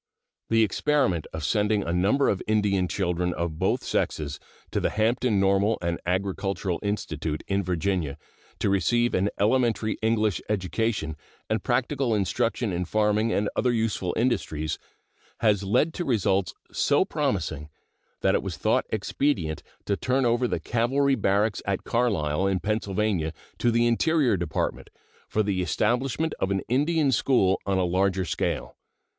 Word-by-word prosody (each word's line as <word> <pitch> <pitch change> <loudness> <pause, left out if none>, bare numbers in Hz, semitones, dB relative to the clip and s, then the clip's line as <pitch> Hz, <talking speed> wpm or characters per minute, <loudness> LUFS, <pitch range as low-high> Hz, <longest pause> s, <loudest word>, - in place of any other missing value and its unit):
The 115 0 +4
experiment 115 - +1
of 80 0 -5
sending 105 +4 +1
a 85 - -2
number 100 +11 +2
of 95 - +1
Indian 105 -4 +2
children 90 -2 -1
of 85 -2 -3
both - - +1
sexes 75 -2 -2 0.3
to - - 0
the - - +1
Hampton 110 0 +1
Normal 100 +3 +3
and 85 -1 -2
Agricultural 95 0 -1
Institute, 80 -7 -3
in 100 0 +1
Virginia, 90 -4 -1 0.4
to 100 - 0
receive 120 +5 +2
an 95 +2 +2
elementary 115 0 +1
English 110 -3 +1
education 100 -4 -1 0.4
and 110 -2 +1
practical 125 0 0
instruction 115 +1 0
in 90 +1 -1
farming 110 +3 +1
and 105 -1 +1
other 125 - +2
useful 110 -6 0
industries, 80 -11 -1 0.6
has 105 -3 +3
led 105 +11 +1
to 175 - -3
results 100 - +1 0.2
so - - +2
promising 75 +1 -2 0.5
that - - +3
it - - +2
was - - -5
thought - - +1
expedient 90 - -1 0.2
to 100 - +1
turn 130 +4 0
over 120 +1 +2
the - - -1
cavalry 135 +4 +1
barracks 105 -3 +1
at 100 -1 -1
Carlisle, 95 -8 +1
in 95 -1 +1
Pennsylvania, 100 -5 -1 0.3
to 120 - +2
the 115 0 +3
Interior 130 0 +3
Department 85 -3 -2 0.4
for 110 - +1
the 100 -2 0
establishment 125 - 0
of 95 - 0
an 95 -1 0
Indian 145 +3 +2
school 110 -6 +2
on 95 -1 +1
a 95 - +2
larger 95 +1 +1
scale. 80 - -2
105 Hz, 150 wpm, -26 LUFS, 95-120 Hz, 0.6 s, The